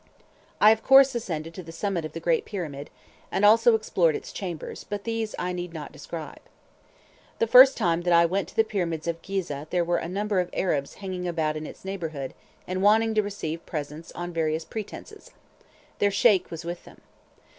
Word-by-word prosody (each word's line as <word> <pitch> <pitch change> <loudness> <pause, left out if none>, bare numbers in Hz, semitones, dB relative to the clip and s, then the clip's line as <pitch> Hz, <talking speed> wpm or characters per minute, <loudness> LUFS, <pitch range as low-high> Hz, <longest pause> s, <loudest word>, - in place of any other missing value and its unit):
I 210 - +8
of 220 0 +1
course 270 +1 +7
ascended 165 -8 -4
to 185 - -7
the 165 -2 -10
summit 170 -1 -2
of 155 - -7
the 165 - -5
great 165 0 +1
Pyramid, 150 -8 -6 0.4
and 205 - +2
also 225 +2 +6
explored 175 -7 +1
its - - -6
chambers, 175 -5 -6
but 205 -1 -5
these 225 -1 -3
I 180 0 -2
need 175 -1 -5
not 150 -3 -7
describe. 155 +1 -8 1.0
The - - +2
first 255 +4 +8
time 170 -1 +1
that 175 0 0
I 170 0 +6
went 190 +4 -1
to - - -15
the 225 - +5
Pyramids 170 -7 -3
of 165 0 -2
Ghizeh 165 -7 -4
there 175 -1 +1
were 175 0 +1
a 165 - -5
number 200 +1 -1
of 180 - -1
Arabs 145 -7 -1
hanging 185 -2 -5
about 160 -3 -1
in 155 0 -5
its - - -12
neighbourhood, 160 -8 -5 0.3
and 185 +1 -2
wanting 220 +2 +4
to 215 - +3
receive 170 -6 -5
presents 150 +1 -6
on 175 0 -6
various 160 0 -1
pretences; 220 - -8 0.7
their 205 - +3
Sheik 200 -1 +3
was 165 0 -7
with 175 +1 -5
them. - - -16
175 Hz, 195 wpm, -26 LUFS, 165-205 Hz, 1.0 s, I